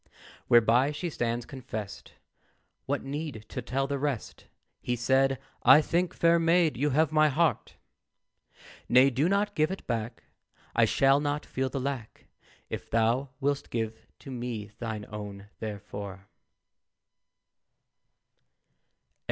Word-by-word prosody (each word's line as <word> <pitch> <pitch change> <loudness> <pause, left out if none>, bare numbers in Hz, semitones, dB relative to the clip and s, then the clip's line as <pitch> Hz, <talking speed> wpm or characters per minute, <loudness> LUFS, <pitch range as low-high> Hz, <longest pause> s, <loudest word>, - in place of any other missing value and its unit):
Whereby 120 +4 +5
she 170 +3 -4
stands 120 -2 -2
confest; 115 -7 -7 0.7
What 140 +1 -1
need 140 -5 -5
to 125 - -4
tell 130 +3 -1
the 140 0 -2
rest? 140 -5 -4 0.3
He 125 - -1
said, 135 +3 +2 0.2
"I - - +8
think, 170 +3 0
fair 170 0 +4
maid, 165 -1 +3
you 145 +5 +1
have 155 +2 +2
my 155 -1 +4
heart. 160 +3 0 1.1
"Nay, 130 +2 +6
do 140 +7 +1
not 205 +1 +1
give 155 -3 +2
it 190 - -6
back, 115 -1 -3 0.5
I - - +5
shall 135 +1 +4
not 145 0 -2
feel 130 0 -2
the 135 - -3
lack, 130 -4 -5 0.4
If - - -6
thou 115 +4 +1
wilt 140 0 -1
give 110 -1 -4
to 135 - -9
me 120 -4 -5
thine 110 -3 -4
own 105 -1 -8
therefor." 100 -2 -7
130 Hz, 125 wpm, -28 LUFS, 115-150 Hz, 1.1 s, I